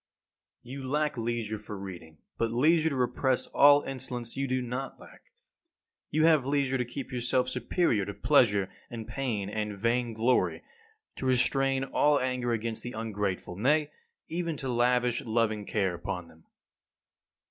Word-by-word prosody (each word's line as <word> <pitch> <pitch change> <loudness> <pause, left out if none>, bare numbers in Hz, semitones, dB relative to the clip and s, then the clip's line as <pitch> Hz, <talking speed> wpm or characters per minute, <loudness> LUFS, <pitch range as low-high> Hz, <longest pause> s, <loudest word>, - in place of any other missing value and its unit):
8. - - -13
You 135 0 -6
lack 150 +3 0
leisure 115 -2 -2
for 105 -1 -8
reading; 90 -5 -9 0.2
but 115 -1 +1
leisure 155 +6 +3
to 140 - -3
repress 125 +1 +1
all 145 0 +6
insolence 125 -3 -4
you 140 0 -1
do 130 0 0
not 125 +2 -5
lack. - - -16 0.8
You 155 +1 +2
have 155 -4 +5
leisure 135 -1 0
to 125 - 0
keep 130 +3 -7
yourself 125 +1 +1
superior 125 - +1
to 100 - -5
pleasure 105 -6 +3 0.2
and 115 -2 -7
pain 115 -5 -2
and 105 0 -3
vain 115 +2 0
glory, 115 +3 +1 0.5
to 130 - -3
restrain 135 +1 +2
all 145 +2 +2
anger 125 -1 -1
against 115 -1 -1
the 120 - -6
ungrateful, 105 -5 -3
nay, 145 - +2 0.4
even 165 -2 -3
to 135 - -4
lavish 125 0 +2
loving 110 -2 0
care 95 -4 0
upon 85 0 -5
them. 80 0 -20
125 Hz, 155 wpm, -29 LUFS, 110-135 Hz, 0.8 s, all